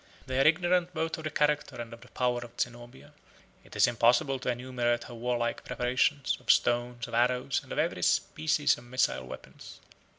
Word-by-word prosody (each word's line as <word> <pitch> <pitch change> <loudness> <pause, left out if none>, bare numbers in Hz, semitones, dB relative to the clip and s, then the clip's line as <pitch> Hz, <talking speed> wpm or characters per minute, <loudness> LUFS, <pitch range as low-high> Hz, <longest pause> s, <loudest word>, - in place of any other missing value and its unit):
They 130 0 -1
are 135 - +5
ignorant 175 +2 +2
both 160 0 -2
of 160 - -8
the - - -1
character 150 -2 0
and 115 0 -6
of 115 - -12
the 125 - -15
power 125 -1 0
of 120 -1 -11
Zenobia. 120 - -5 0.5
It - - -15
is - - +5
impossible 120 +3 +2
to 125 - -3
enumerate 120 -1 -1
her 120 - -10
warlike 120 0 -2
preparations, 130 +3 0
of - - -18
stones, 120 0 +1
of 120 - -11
arrows, 125 +2 +1
and - - -16
of - - -4
every - - 0
species 150 -3 +1
of 120 - -15
missile 120 - 0
weapons. - - -11
125 Hz, 190 wpm, -29 LUFS, 120-140 Hz, 0.5 s, are